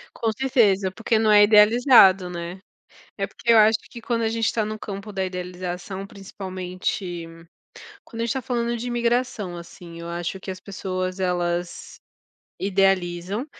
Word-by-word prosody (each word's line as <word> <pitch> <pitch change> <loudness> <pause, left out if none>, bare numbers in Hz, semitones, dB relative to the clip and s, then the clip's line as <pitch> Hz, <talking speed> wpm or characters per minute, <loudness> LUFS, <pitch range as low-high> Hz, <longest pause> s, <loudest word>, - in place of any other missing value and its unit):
Com 225 -1 0
certeza, 205 -8 +2
porque 225 +2 0
não 220 -1 +3
é 205 0 +8
idealizado, 210 -3 +6
né. 175 +1 -6 0.6
É, 195 0 -2
porque 235 +4 -1
eu 230 - +7
acho 215 +1 +6
que 235 - -10
quando 230 0 -1
a 220 - +1
gente 225 0 -1
está 220 - +1
no 215 0 -5
campo 200 +1 -7
da 190 -1 -2
idealização, 180 +1 -6
principalmente 185 -3 -5 0.8
quando 230 -1 -7
a - - 0
gente - - -3
está 265 +2 -1
falando 235 -1 -1
de 240 +2 -5
imigração, 240 -5 -1
assim, 170 -1 -11
eu 170 - -7
acho 175 +2 -4
que 190 - -9
as 185 - -8
pessoas, 185 -1 -4
elas 175 -1 -2 0.6
idealizam, 195 +2 0
195 Hz, 160 wpm, -23 LUFS, 180-225 Hz, 0.8 s, é